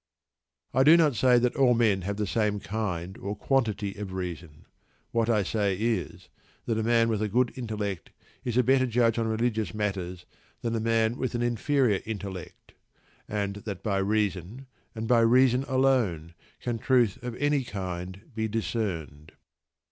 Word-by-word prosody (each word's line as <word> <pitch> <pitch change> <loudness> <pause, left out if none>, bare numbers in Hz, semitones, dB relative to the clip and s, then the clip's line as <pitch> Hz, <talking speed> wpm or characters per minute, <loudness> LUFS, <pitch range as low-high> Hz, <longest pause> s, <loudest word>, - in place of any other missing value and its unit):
I 130 - +3
do 155 +4 +8
not 155 -6 +3
say 125 +3 +4
that 120 0 +1
all 130 -3 +4
men 110 -5 +2
have 100 +3 -3
the 105 - 0
same 105 0 0
kind 95 -4 -3
or 100 +2 -4
quantity 105 -4 0
of 100 -2 -6
reason. 85 -4 -6 0.5
What 115 0 +1
I 105 -3 +3
say 100 -1 0
is, 110 -6 -2 0.4
that 110 -1 0
a - - 0
man 115 0 +3
with 110 -2 0
a 110 - +1
good 125 +4 +1
intellect 105 -6 -4 0.3
is 120 -1 -2
a 125 - +5
better 130 +1 +3
judge 115 -1 +2
on 115 - 0
religious 110 -4 -1
matters 95 -4 -3 0.4
than 115 -1 -1
a - - 0
man, 115 +1 +1
with 130 -1 -2
an 120 - 0
inferior 120 -2 +1
intellect; 100 -5 -7 0.5
and 100 -1 -2
that 100 -3 -7
by 100 -3 0
reason, 105 +3 -1 0.3
and 110 0 -4
by 120 0 +5
reason 125 +3 +4
alone, 125 - +1 0.3
can 120 -2 -3
truth 120 -4 +2
of 120 -1 -5
any 145 0 +1
kind 95 -3 -5
be 110 0 -1
discerned. 90 -9 -3
110 Hz, 165 wpm, -27 LUFS, 100-120 Hz, 0.5 s, do